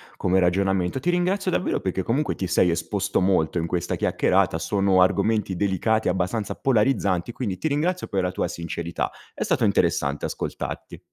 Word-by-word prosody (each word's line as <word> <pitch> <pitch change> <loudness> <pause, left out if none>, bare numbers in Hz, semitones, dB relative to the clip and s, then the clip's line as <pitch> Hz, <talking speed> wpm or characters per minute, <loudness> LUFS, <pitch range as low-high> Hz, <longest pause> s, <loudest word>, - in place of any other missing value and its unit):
come 95 +1 +1
ragionamento. 95 +3 +1
Ti 140 - -1
ringrazio 185 +2 +1
davvero 185 - 0
perché 95 0 -2
comunque 135 +10 0
ti 95 - -3
sei 90 0 +3
esposto 90 +4 -1
molto 90 -3 +2
in 85 - 0
questa 85 0 -2
chiacchierata, - - +1
sono 95 +1 +2
argomenti 100 +1 +2
delicati, 100 +4 +1
abbastanza 95 +4 -1
polarizzanti, 105 -7 +1
quindi 110 -6 -4
ti - - -2
ringrazio 160 +5 -1
per 95 -2 -1
la 90 - 0
tua 90 - -1
sincerità. 85 -1 -4 0.2
È - - -3
stato - - 0
interessante 70 +1 +1
ascoltarti. - - -5
95 Hz, 160 wpm, -24 LUFS, 90-115 Hz, 0.2 s, sei